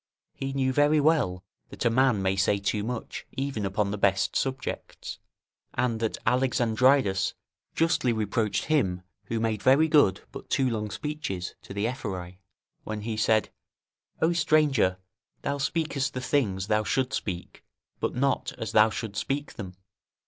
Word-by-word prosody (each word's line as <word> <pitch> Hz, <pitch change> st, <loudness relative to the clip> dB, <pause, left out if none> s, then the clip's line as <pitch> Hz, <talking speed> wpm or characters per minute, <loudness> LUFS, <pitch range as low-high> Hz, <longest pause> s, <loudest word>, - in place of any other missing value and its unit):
He 135 Hz, 0 st, -4 dB
knew 130 Hz, -1 st, 0 dB
very 145 Hz, +2 st, +4 dB
well, 140 Hz, -, +2 dB, 0.3 s
that -, -, -5 dB
a 115 Hz, -, +4 dB
man 125 Hz, -4 st, +3 dB
may 95 Hz, 0 st, +2 dB
say 95 Hz, +1 st, +2 dB
too 100 Hz, +1 st, -1 dB
much 120 Hz, +1 st, -5 dB
even 135 Hz, -7 st, -2 dB
upon 100 Hz, +1 st, 0 dB
the 105 Hz, -, -3 dB
best 95 Hz, -1 st, +2 dB
subjects, 135 Hz, 0 st, -3 dB, 0.6 s
and 115 Hz, -3 st, 0 dB
that 115 Hz, -1 st, -1 dB
Alexandridas 125 Hz, -3 st, +3 dB, 0.4 s
justly 165 Hz, -6 st, +2 dB
reproached 110 Hz, -1 st, 0 dB
him 95 Hz, -13 st, +1 dB, 0.2 s
who 115 Hz, +3 st, -2 dB
made 110 Hz, -2 st, -1 dB
very 140 Hz, +5 st, +5 dB
good. 145 Hz, -, +4 dB
but -, -, -10 dB
too 135 Hz, -, +2 dB
long 110 Hz, -3 st, -2 dB
speeches 125 Hz, -11 st, -4 dB
to -, -, -13 dB
the 100 Hz, +2 st, -1 dB
Ephori, 95 Hz, -7 st, -5 dB, 0.4 s
when 110 Hz, -1 st, -4 dB
he 110 Hz, +1 st, -3 dB
said: 110 Hz, 0 st, +2 dB, 0.7 s
"O 165 Hz, +2 st, +4 dB
stranger! 150 Hz, -, +3 dB, 0.5 s
thou 140 Hz, 0 st, -1 dB
speakest 140 Hz, -3 st, -1 dB
the -, -, -1 dB
things 110 Hz, -8 st, 0 dB
thou 105 Hz, +1 st, +2 dB
shouldst 130 Hz, +4 st, 0 dB
speak, 90 Hz, -3 st, -6 dB, 0.4 s
but -, -, -2 dB
not 135 Hz, +2 st, 0 dB
as 110 Hz, -1 st, -4 dB
thou 110 Hz, 0 st, +6 dB
shouldst 110 Hz, -2 st, -4 dB
speak 145 Hz, +1 st, -3 dB
them." 95 Hz, -4 st, -8 dB
115 Hz, 155 wpm, -27 LUFS, 100-135 Hz, 0.7 s, thou